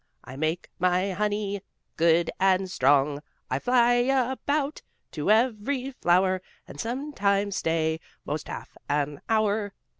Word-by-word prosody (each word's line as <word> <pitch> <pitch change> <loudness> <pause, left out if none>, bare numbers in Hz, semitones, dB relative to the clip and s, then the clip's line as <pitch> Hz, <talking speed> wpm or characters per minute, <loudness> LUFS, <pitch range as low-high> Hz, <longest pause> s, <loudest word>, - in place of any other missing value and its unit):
I 130 +1 -10
make 155 +4 -2
my 185 +2 +2
honey 205 0 -1 0.3
Good 165 0 +3
and 190 -1 +2
strong. 140 0 +3 0.3
I 130 - +1
fly 245 - +4
about 270 +3 0 0.3
To 155 +2 -3
every 250 +4 +2
flower 185 -4 +2 0.3
And - - -11
sometimes 205 -6 0
stay 160 -1 0 0.3
'Most 150 0 -4
half - - -8
an 145 0 -1
hour." 215 -2 +1
195 Hz, 120 wpm, -26 LUFS, 160-230 Hz, 0.3 s, fly